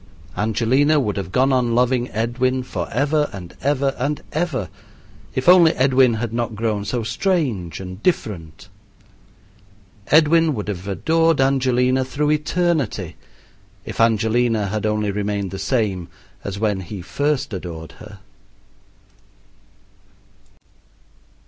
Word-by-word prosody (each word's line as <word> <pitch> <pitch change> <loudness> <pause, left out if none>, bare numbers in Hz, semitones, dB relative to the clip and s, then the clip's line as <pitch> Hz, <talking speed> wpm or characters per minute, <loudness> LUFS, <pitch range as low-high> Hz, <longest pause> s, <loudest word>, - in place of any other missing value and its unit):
Angelina 125 +8 +2
would 105 -7 -1
have 95 -2 -4
gone 130 +6 +3
on 120 -2 +1
loving 125 0 +2
Edwin 125 +4 -1
forever 140 - -1
and 90 -5 -9
ever 140 -1 +1
and 145 +3 -2
ever 155 - -1 0.7
if 130 - -2
only 175 -2 +7
Edwin 130 -3 +3
had 115 0 -3
not 115 -1 -2
grown 105 -1 -1
so 115 +3 -2
strange 115 - -1
and 95 +1 -8
different. 90 - -2 1.4
Edwin 160 0 +4
would 105 -2 -4
have 95 -1 -5
adored 165 +9 +2
Angelina 130 -1 +2
through 150 +3 -1
eternity 150 - 0 0.7
if - - -3
Angelina 115 -1 +2
had 110 +1 -1
only 105 -1 0
remained 100 -1 -2
the 95 - -6
same 100 -7 -1 0.4
as 100 0 -5
when 105 -2 0
he 95 0 -7
first 145 - -1
adored 85 -4 -6
her. - - -12
120 Hz, 115 wpm, -21 LUFS, 100-140 Hz, 1.4 s, only